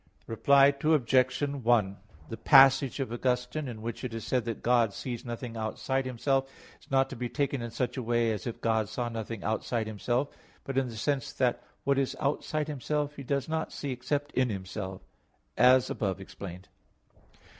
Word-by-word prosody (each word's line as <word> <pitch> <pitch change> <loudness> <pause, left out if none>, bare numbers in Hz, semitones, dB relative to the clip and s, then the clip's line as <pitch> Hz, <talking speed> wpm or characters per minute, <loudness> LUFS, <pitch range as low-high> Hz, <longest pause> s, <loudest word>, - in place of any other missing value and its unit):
Reply 140 +5 +5
Obj. 130 -4 +3 0.2
1: 110 -5 +2 0.3
The 115 - -4
passage 135 0 +6
of 130 -4 -2
Augustine 125 +4 -1
in 110 -3 -7
which 115 +2 -5
it 120 -3 -4
is 115 -2 -5
said 125 -2 0
that 115 -1 -4
God 120 -4 +3
"sees 120 -3 -5
nothing 120 -1 -6
outside 130 +4 -2
Himself" 135 +2 0 0.3
is - - -22
not 135 0 +3
to - - -5
be 120 0 -4
taken 140 -2 -1
in 120 - -4
such 125 +3 -2
a - - -1
way, 120 -1 +1
as 105 +1 -4
if 115 - -5
God 110 -2 +1
saw 120 +2 -2
nothing 115 -2 -5
outside 110 +1 -1
Himself, 120 +6 -1 0.3
but 135 - -5
in 135 -1 +2
the 115 - -8
sense 135 +2 -1
that 125 -2 +1 0.2
what 140 0 +2
is 135 - -1
outside 150 +1 -1
Himself 150 +1 -2
He 140 - -8
does 140 0 -1
not 160 0 -2
see 140 - -4
except 140 +4 -2
in 130 -1 +1
Himself, 95 -1 -5 0.5
as 125 0 +6
above 100 -2 -2
explained. 95 -1 -9
125 Hz, 180 wpm, -29 LUFS, 115-135 Hz, 0.5 s, passage